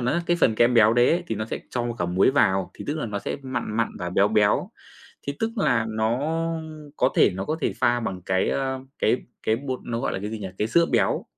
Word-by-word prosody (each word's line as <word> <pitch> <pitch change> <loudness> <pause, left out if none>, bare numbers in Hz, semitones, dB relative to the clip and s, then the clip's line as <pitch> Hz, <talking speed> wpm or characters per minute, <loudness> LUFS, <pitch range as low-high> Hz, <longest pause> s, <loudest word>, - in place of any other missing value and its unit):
nó, 125 0 0
á, 170 - +1
cái 175 - +2
phần 110 - +4
kem 120 +2 +3
béo 110 -1 +6
đấy 120 +1 +4
ấy 175 +2 +1
thì 110 - -2
nó 110 - -3
sẽ 110 - -4
cho 120 -1 -2
cả 90 - 0
muối 90 +6 +3
vào, 95 -9 +2
thì - - -9
tức 145 - 0
là 150 - -2
nó 105 -1 -3
sẽ - - -4
mặn 130 -4 -4
mặn 115 -1 +1
và 90 0 -4
béo 100 +3 +3
béo, 105 -1 +2 0.6
thì 140 - -1
tức 225 - 0
là 125 - +2
nó 110 +2 0 0.8
có 125 - +3
thể - - +6
nó 95 +1 -4
có 155 +9 -2
thể - - 0
pha 120 0 +3
bằng 95 -5 -4
cái, 95 0 +1
ơ, 130 -1 -1 0.2
cái 110 - +3 0.3
cái 110 - +1
bột 130 -1 -4
nó 115 -1 -3
gọi - - -1
là - - -2
cái 105 +2 -5
gì 110 - -5
nhỉ, 100 -2 -5
cái 105 - 0
sữa 170 +6 +4
béo, - - +2
115 Hz, 265 wpm, -24 LUFS, 105-130 Hz, 0.8 s, béo